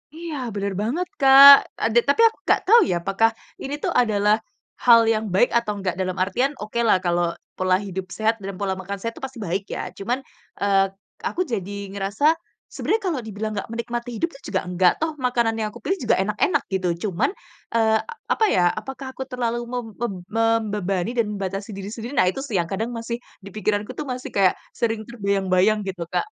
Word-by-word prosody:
Iya 330 -1 -6 0.2
bener 200 -1 -2
banget, 295 +12 -1
Kak. 275 0 +10 0.3
Ada, 225 +1 +2
tapi 285 - +4
aku 450 - -4
nggak - - +4
tahu 465 +4 +8
ya - - +1
apakah 195 +5 +3 0.3
ini 275 - -5
tuh - - 0
adalah 215 -3 +3 0.5
hal 235 -2 +8
yang 220 -1 +1
baik 245 - +4
atau 235 -3 +1
nggak. 185 -3 -2
Dalam 185 -1 -1
artian, 245 +9 0
okelah 225 -1 +2
kalau 175 -1 0 0.2
pola 185 0 +2
hidup 190 -1 -4
sehat 220 +1 +1
dan 195 -1 -6
pola 195 0 -2
makan 195 +2 -5
sehat 230 +2 -3
itu - - -12
pasti 260 -2 -10
baik 190 +1 -2
ya. - - -5
Cuman, 245 +7 -2 0.4
eee, 195 -1 +4 0.4
aku 365 - -2
jadi 200 - -5
ngerasa 200 +6 -2 0.5
sebenarnya 445 0 -1
kalau 325 -7 -1
dibilang 215 0 -4
nggak 200 - -4
menikmati 235 +1 -4
hidup 335 - 0
tuh 275 - -15
juga 190 - +1
nggak 180 0 +3
toh, 320 0 0
makanan 240 -3 +1
yang 215 - 0
aku 240 - -12
pilih 385 +1 -1
juga - - +3
enak-enak 290 -5 +1
gitu. 190 -1 0 0.2
Cuman 180 - 0 0.5
eee, 220 -1 +3 0.3
apa 440 - +3
ya, 180 - +3 0.2
apakah 265 0 -8
aku 265 - -6
terlalu 240 -1 -2
mem 245 -1 -3
mem 240 -4 -2 0.2
membebani 215 -3 0
dan 230 - +3
membatasi 195 +1 -4
diri 195 0 -6
sendiri? 230 +3 -6
Nah 180 - +4
itu - - -7
sih 240 -7 -5
yang 170 - -1
kadang 220 +5 -2
masih 230 +1 -4 0.3
di 200 - -9
pikiranku 210 0 -1
tuh, 300 - -4
masih 255 0 -5
kayak 195 -2 +4 0.2
sering 225 -2 -1
terbayang-bayang 200 -2 +1
gitu, 185 -3 -4
Kak. - - +1
220 Hz, 195 wpm, -23 LUFS, 195-245 Hz, 0.5 s, Kak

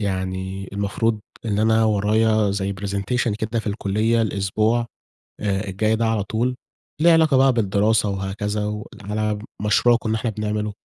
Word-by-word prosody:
يعني 95 -1 -3
المفروض 105 +2 -1 0.2
إن 105 -2 -1
أنا 110 +1 +3
ورايا 110 0 +2
زي 100 0 -1
presentation 100 +4 -1
كده 110 +1 -2
في - - -15
الكلية 110 +2 +1
الأسبوع 110 +3 0 0.6
آآ 100 0 -1
الجاي 110 +3 +1
ده 115 +1 0
على 110 -2 +1
طول، 115 +5 -1 0.5
ليه 170 +1 +6
علاقة 160 -4 +4
بقى 135 0 +5
بالدراسة 105 -1 +2
وهكذا، 105 +2 -2
وعلى 105 0 -3 0.2
مشروع 115 +3 +4
كنا 110 -2 -2
إحنا 110 +1 -1
بنعمله، 105 0 -2
105 Hz, 145 wpm, -22 LUFS, 100-110 Hz, 0.6 s, ليه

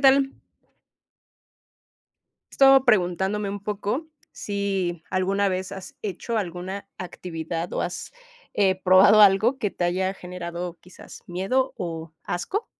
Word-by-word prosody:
tal? 270 0 +5 2.2
Estaba 270 -1 +6
preguntándome, 195 -1 +1
un 200 0 -5
poco, 210 +8 -2 0.3
si, 195 -4 -2
¿alguna 195 +2 +1
vez 185 0 -3
has 195 +8 -9
hecho 215 +3 -3
alguna 190 +1 -5
actividad 170 -2 -5
o - - -1
has, 175 - -5 0.4
eh, 190 -2 +2
probado 190 +3 +7
algo 210 +6 +5
que 210 -6 -1
te 175 - -3
haya 185 +2 0
generado 175 -1 -6
quizás 180 0 -14
miedo 195 +10 0
o 165 -2 -5
asco? 385 - -3
190 Hz, 115 wpm, -24 LUFS, 180-210 Hz, 2.2 s, probado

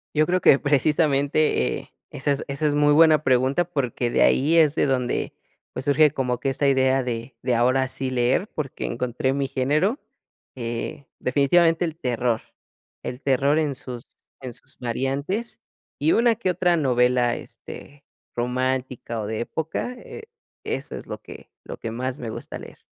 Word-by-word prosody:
Yo 155 +1 +4
creo 185 +2 +1
que 140 - +6
precisamente, 145 - +2
eh, - - -14 0.2
esa 140 +2 -1
es 140 - -2
esa 140 +3 -1
es 145 - +1
muy 145 0 +4
buena 155 -1 +6
pregunta, 130 +5 +2
porque, 130 -7 -2
de - - +2
ahí 155 +5 +4
es 155 -2 +5
de - - +2
donde 125 -2 -1 0.4
pues, 130 - -6
surge 145 +1 +5
como 125 -4 -2
que 135 - -1
esta 140 +2 0
idea 130 -1 +3
de 120 0 -5
de 125 -1 +1
ahora 130 +3 +3
sí 130 0 -4
leer, 130 - +1
porque 145 -4 -4
encontré 125 +2 -1
mi 140 -1 0
género, 150 - 0 0.6
eh, 120 +3 -5
definitivamente 165 +6 +3
el 160 -1 -3
terror, 120 -5 -1 0.6
el 125 +2 -5
terror 140 +3 +2
en 145 -3 -1
sus 125 -2 -8 0.4
en 130 -2 -6
sus - - -17
variantes 140 - -2 0.4
y 155 +3 +3
una 235 0 +4
que 205 -4 -1
otra 175 -1 +2
novela, 125 -4 +2
este, 145 0 -11 0.3
romántica 125 -1 -2
o 105 - -4
de 110 +1 -3
época, 160 - -3
eh, 445 - -10 0.4
eso - - -4
es - - -9
lo - - -6
que - - -12
lo - - -8
que 115 - -5
más 130 +3 -3
me 115 - -5
gusta - - -7
leer. - - -12
135 Hz, 170 wpm, -24 LUFS, 125-155 Hz, 0.6 s, que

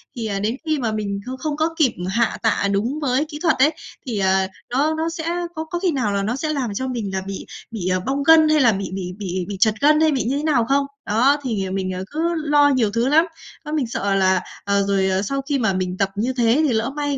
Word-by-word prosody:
thì, 235 -2 -4
à, 200 -2 -2
đến 215 +4 -1
khi 310 -2 0
mà 230 -4 -1
mình 205 -2 -3
không 255 +1 -5
không 300 +2 -3
có 315 +1 +1
kịp 290 -7 +3 0.2
hạ 230 +3 +1
tạ 200 - +1
đúng 230 +9 -1
với 270 +1 +1
kỹ 300 -1 -8
thuật 330 - +3
ấy, 285 +4 +5 0.4
thì, 225 -5 -2
ờ, 190 0 +2 0.2
nó 280 +6 +1
nó 320 +1 -1
sẽ 330 -1 -5 0.3
có 315 - -3
có 345 +2 -4
khi 365 -1 +1
nào 255 -8 0
là 200 0 0
nó 220 +4 -1
sẽ 305 +3 -2
làm 255 -7 -2
cho 260 +6 -3
mình 230 -6 -3
là 190 - -1
bị 195 0 -6 0.3
bị, 205 -6 -4
à, 185 0 +1
bong 275 +2 -1
gân 315 +1 +6
hay 310 -1 +4
là 240 -3 +5
bị 195 -1 -3
bị 180 -1 -4
bị 185 -3 -3
bị 200 - -4
trật 220 0 +4
gân 300 +1 +5
hay 315 -1 +4
bị 270 -3 0
như 260 +5 -1
thế 290 - -3
nào 280 -7 +2
không? 280 +1 +3 0.2
Đó, 250 +7 +3
thì, 220 -7 -2
à, - - -5
mình, 190 -1 -2
à, 185 - -4
cứ 300 - -5 0.2
lo 295 -2 +3
nhiều 245 -7 +2
thứ 230 +3 0
lắm. 315 +4 +5 0.4
Đó 300 - -5
mình 300 -5 0
sợ 200 -3 -1
là, 190 -1 +3 0.2
ờ, 200 0 +1
rồi, 195 -1 +2
ờ, 190 0 +1
sau 275 +7 -2
khi 275 0 -1
mà 220 -5 +1
mình 185 0 -2
tập 195 0 +1
như 235 +6 -1
thế 240 +3 +3
thì 255 - +1
lỡ 225 +2 0
may 290 -1 -1
240 Hz, 275 wpm, -21 LUFS, 200-290 Hz, 0.4 s, gân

